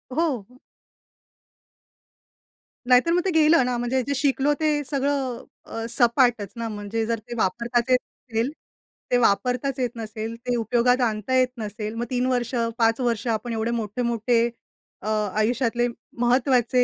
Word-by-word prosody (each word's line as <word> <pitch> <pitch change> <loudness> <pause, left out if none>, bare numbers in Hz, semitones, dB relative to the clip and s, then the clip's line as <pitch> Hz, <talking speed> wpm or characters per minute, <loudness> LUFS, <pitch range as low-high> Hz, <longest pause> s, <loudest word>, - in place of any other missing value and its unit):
हो. 255 -8 -1 2.3
नाहीतर 250 +6 +5
मग 355 - +3
ते 380 - +2
गेलं 315 -2 +5
ना, 250 -1 -1
म्हणजे 245 +2 0
जे 280 - -2
शिकलो 280 0 +2
ते 310 -1 +2
सगळं 270 -3 -1 0.2
अ, 225 0 -5
सपाटच 235 -4 +3
ना 230 0 -3
म्हणजे 205 +2 -2
जर 230 0 -1
ते 240 +3 -9
वापरताच 235 +5 0
येत 255 0 +5 0.3
नसेल 230 +4 0 0.6
ते 245 - +5
वापरताच 250 +6 +1
येत 250 -1 +1
नसेल, 220 0 -5
ते 245 +1 -3
उपयोगात 245 +2 +2
आणता 215 +3 -2
येत 255 0 +4
नसेल. 215 0 -5
मग 235 +1 -2
3 250 0 0
वर्ष 245 -1 0 0.2
5 225 0 +3
वर्ष 230 -2 -1
आपण 235 +2 -4
एवढे 225 +1 -1
मोठे-मोठे 235 +2 0 0.6
अ, 210 - -7
आयुष्यातले 225 +3 +1 0.4
महत्वाचे 250 0 +3
240 Hz, 145 wpm, -24 LUFS, 225-255 Hz, 2.3 s, नाहीतर